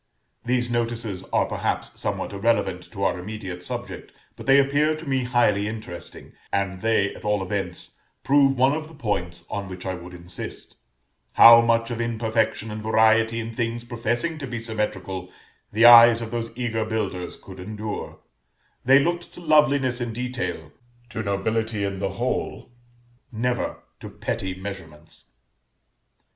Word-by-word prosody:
(These 120 0 0
notices 115 -5 -2
are - - +1
perhaps - - -3
somewhat - - -3
irrelevant 100 -3 0
to 100 -3 -5
our 90 - +1
immediate 95 -2 -6
subject, - - -6 0.2
but - - -11
they 135 0 +7
appear 145 +3 +3
to 155 0 -9
me 130 -2 0
highly 105 -5 +2
interesting; 110 -5 -8 0.2
and 95 -2 -1
they, 110 -3 +2
at - - -13
all 105 -2 0
events, 95 -2 -5 0.2
prove 135 -1 +4
one 130 +3 +4
of 155 0 -4
the 160 - -14
points 90 - -3
on 100 -2 -5
which 90 0 -8
I 95 - -2
would 90 0 -9
insist, 85 0 -7 0.6
how 115 0 +10
much 115 0 +1
of 120 0 -3
imperfection 110 -1 -1
and 105 0 -5
variety 110 +1 +3
in 115 0 -5
things 115 0 -3
professing 120 +7 -2
to 135 - -5
be 120 -1 -4
symmetrical 100 -5 -4 0.4
the 110 +3 +4
eyes 120 -1 +9
of 115 -1 -6
those 115 -1 -3
eager 115 -2 -1
builders 105 -5 -3
could 95 -1 -12
endure: 105 +2 -6 0.6
they 135 +2 +6
looked 170 +4 0
to - - -10
loveliness 145 -6 +3
in 120 -2 -3
detail, 125 +1 -4 0.4
to 110 - -4
nobility 110 +1 -1
in 100 -1 -3
the 95 -1 -2
whole, 120 +2 -3 0.6
never 125 +2 -2 0.2
to - - -8
petty 95 -1 -4
measurements.) 90 -5 -10
115 Hz, 155 wpm, -24 LUFS, 100-120 Hz, 0.6 s, how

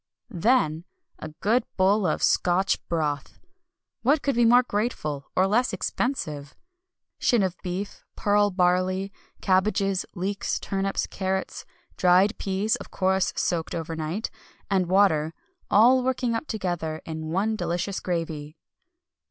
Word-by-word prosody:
Than 175 -5 +2 0.3
a - - -6
good 230 +4 +2
bowl 195 +1 +3
of - - -1
Scotch 185 +2 +2
Broth, 150 -4 -2 0.6
what 280 +5 +2
could 280 - +1
be 235 0 +3
more 245 +2 +6
grateful, 205 - -3
or 185 - +4
less 230 +6 +1
expensive? 150 - -3 0.6
Shin 235 -5 +3
of 185 -2 -1
beef, 185 +3 -5
pearl 205 0 +2
barley, 185 +1 +1 0.3
cabbages, 195 0 +1
leeks, 195 +2 -2
turnips, 195 0 -1
carrots, 190 0 -3 0.3
dried 185 +4 +4
peas 195 +3 0
(of - - -11
course 190 0 +1
soaked 165 -2 -1
overnight), 165 +4 -3 0.4
and 185 -2 +2
water 165 -5 +3 0.3
"all 245 +5 +6
working 255 -2 0
up 230 +7 -3
together 175 -7 -3
in 160 -1 -5
one 200 +6 0
delicious 190 0 -2
gravy." 160 -3 -4
190 Hz, 125 wpm, -25 LUFS, 170-210 Hz, 0.6 s, more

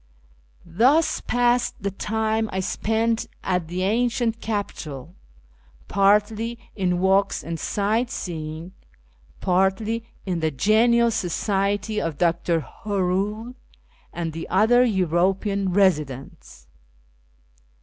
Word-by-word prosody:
Thus 250 - +3
passed 245 0 +2
the 200 0 -2
time 220 +2 -1
I 190 - -2
spent 225 +4 0 0.2
at 180 -3 -1
the 180 +2 -3
ancient 230 +2 0
capital, 175 - -4 0.7
partly 210 +4 +2 0.2
in 180 -3 0
walks 195 +1 +2
and 165 -1 -5
sight 220 +4 0
seeing, 160 -4 -5 0.7
partly 195 +5 0 0.2
in 180 -3 -1
the 160 -1 +1
genial 230 - +3
society 205 +2 -1
of 165 -4 -3
Dr. 170 -1 +1
Hoernle 200 - -2 0.6
and 165 -2 -4
the 165 - -6
other 225 +6 +4
European 190 -1 +1
residents. 150 -9 -1
200 Hz, 100 wpm, -23 LUFS, 180-225 Hz, 0.7 s, other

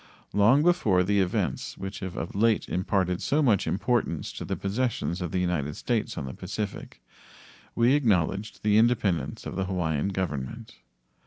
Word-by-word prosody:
Long 115 +9 +5
before 110 - +3
the 100 +2 +2
events 95 -2 -1
which 95 +1 -6
have 95 -2 -6
of 80 - -4
late 110 +2 +2
imparted 90 -1 0
so 150 +2 +2
much 110 -8 +3
importance 100 -5 -1
to - - -6
the - - -2
possessions 100 -4 -2
of 90 -3 -3
the 95 - -1
United 85 -5 -1
States 120 -3 -2
on - - -3
the 65 - -6
Pacific 105 +8 -6 0.7
we 120 +3 +4
acknowledged 105 - +1
the 105 0 +4
independence 110 -7 +1
of - - -5
the 95 - -1
Hawaiian 85 -4 -1
Government. 80 -10 -4
95 Hz, 160 wpm, -27 LUFS, 90-110 Hz, 0.7 s, Long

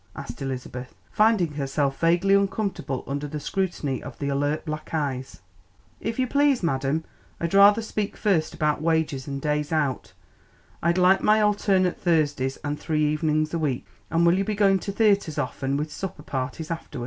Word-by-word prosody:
asked - - -8
Elizabeth, 130 -1 -5 0.2
finding 210 -7 +3
herself 140 -1 -1
vaguely 175 +4 +3
uncomfortable 195 - 0
under 145 +1 -3
the 150 +1 -5
scrutiny 150 -5 -2
of - - -9
the 140 - -2
alert 145 +3 -1
black 155 -1 -5
eyes. 135 -7 -3 0.6
"If 225 0 -3
you 260 - +2
please, 280 -2 +2
madam, 140 0 0 0.4
I'd 170 +1 -2
rather 205 +3 +6
speak 215 -1 -3
first 185 -7 +1
about 150 -1 0
wages 160 -4 0
and 140 -1 -4
days 150 +1 -1
out. 150 -5 -1 0.7
I'd 170 +2 +2
like 185 +1 +5
my 215 +1 +4
alternate 200 -3 +2
Thursdays 145 -6 +1
and 145 0 -3
three 155 -2 0
evenings 155 +1 0
a 165 - 0
week; 140 -6 -1 0.2
and 165 +1 +2
will 170 - +5
you - - +2
be 210 +1 -2
going 195 -2 +4
to 200 - -4
theatres 200 -7 +2
often 135 0 -2
with 150 +1 -3
supper 190 - -6
parties 135 +5 -4
after? 165 -5 -5
155 Hz, 170 wpm, -25 LUFS, 145-195 Hz, 0.7 s, rather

